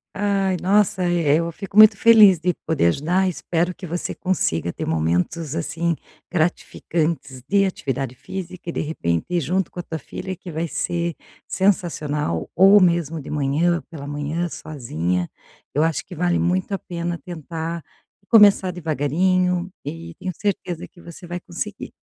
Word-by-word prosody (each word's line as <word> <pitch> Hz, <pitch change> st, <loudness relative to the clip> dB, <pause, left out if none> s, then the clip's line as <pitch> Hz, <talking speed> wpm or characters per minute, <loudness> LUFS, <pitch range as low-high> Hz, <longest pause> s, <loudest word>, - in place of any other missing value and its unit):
Ai, 195 Hz, -2 st, +1 dB
nossa, 195 Hz, 0 st, +2 dB
eh, 170 Hz, -4 st, +2 dB
eu 170 Hz, +1 st, 0 dB
fico 195 Hz, +4 st, -7 dB
muito 215 Hz, -1 st, +9 dB
feliz 210 Hz, -4 st, +7 dB
de 180 Hz, +2 st, +1 dB
poder 155 Hz, -, +2 dB
ajudar. 175 Hz, -, +1 dB
Espero 175 Hz, 0 st, -1 dB
que 185 Hz, -, -9 dB
você 175 Hz, +1 st, -4 dB
consiga 85 Hz, -, -1 dB
ter -, -, -5 dB
momentos, 85 Hz, -, 0 dB
assim, 165 Hz, +1 st, -1 dB, 0.4 s
gratificantes 155 Hz, -5 st, -1 dB
de 200 Hz, 0 st, +3 dB
atividade 135 Hz, -9 st, -2 dB
física 180 Hz, +3 st, -7 dB
e -, -, -3 dB
de -, -, -1 dB
repente 85 Hz, -, -1 dB
ir 175 Hz, -1 st, +1 dB
junto 180 Hz, +4 st, 0 dB
com -, -, -9 dB
a -, -, -3 dB
tua 160 Hz, -2 st, -5 dB
filha, 185 Hz, +7 st, -6 dB
que 180 Hz, 0 st, -10 dB
vai 165 Hz, +2 st, -2 dB
ser 170 Hz, +1 st, -2 dB, 0.3 s
sensacional. 150 Hz, -, 0 dB
Ou 195 Hz, +3 st, +7 dB
mesmo 170 Hz, -3 st, +1 dB
de 135 Hz, -, -10 dB
manhã, 150 Hz, +4 st, +1 dB
pela 145 Hz, -4 st, -8 dB
manhã, 145 Hz, +4 st, -2 dB
sozinha, 90 Hz, -, -3 dB, 0.5 s
eu 150 Hz, -, +3 dB
acho 160 Hz, -3 st, 0 dB
que -, -, -10 dB
vale 175 Hz, +1 st, +1 dB
muito 185 Hz, +3 st, 0 dB
a 195 Hz, -, -1 dB
pena 170 Hz, -1 st, -4 dB
tentar 165 Hz, -1 st, -5 dB, 0.5 s
começar 205 Hz, -4 st, +6 dB
devagarinho 180 Hz, +3 st, 0 dB
e 165 Hz, +2 st, -7 dB
tenho 185 Hz, -, -4 dB
certeza 180 Hz, -4 st, -3 dB
que 180 Hz, -, -21 dB
você 170 Hz, +1 st, -11 dB
vai 175 Hz, +1 st, -4 dB
conseguir. 195 Hz, +4 st, -6 dB
170 Hz, 160 wpm, -22 LUFS, 150-185 Hz, 0.5 s, muito